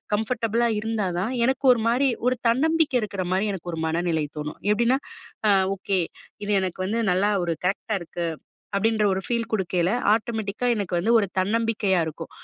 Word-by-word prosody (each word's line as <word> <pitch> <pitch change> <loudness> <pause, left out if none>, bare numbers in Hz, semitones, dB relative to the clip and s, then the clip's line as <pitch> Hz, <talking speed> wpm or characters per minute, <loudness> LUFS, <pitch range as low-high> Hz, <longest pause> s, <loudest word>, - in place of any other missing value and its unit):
கம்ஃபர்டபுளா 230 +1 0
இருந்தா 220 -3 -1
தான், 220 +8 -1
எனக்கு 265 +1 0
ஒரு 230 - -2
மாரி 260 +3 +3 0.2
ஒரு 255 -1 +2
தன்னம்பிக்கை 305 +1 +2
இருக்கிறமாரி 190 0 -1
எனக்கு 175 -1 -6
ஒரு 160 - -3
மனநிலை 165 -1 0
தோணும். 150 0 -5
எப்பிடின்னா, 235 +5 +2 0.5
"அ - - +6 0.2
ஓகே! 195 0 -1 0.5
இது 205 - 0
எனக்கு 185 0 -3
வந்து 230 +3 0
நல்லா 200 +3 +2
ஒரு 170 - 0
கரெக்ட்டா 200 +3 -1
இருக்கு." 170 0 -4 0.5
அப்பிடின்ற 215 +1 +2
ஒரு 190 - -2
ஃபீல் 235 -1 -1
குடுக்கையில 180 -4 0 0.2
ஆட்டோமெட்டிக்கா 220 +1 -1
எனக்கு 200 -4 -3
வந்து 200 +7 +1
ஒரு 205 -3 +2
தன்னம்பிக்கையா 210 -1 +1
இருக்கும். 160 +1 -7
210 Hz, 160 wpm, -24 LUFS, 185-230 Hz, 0.5 s, அ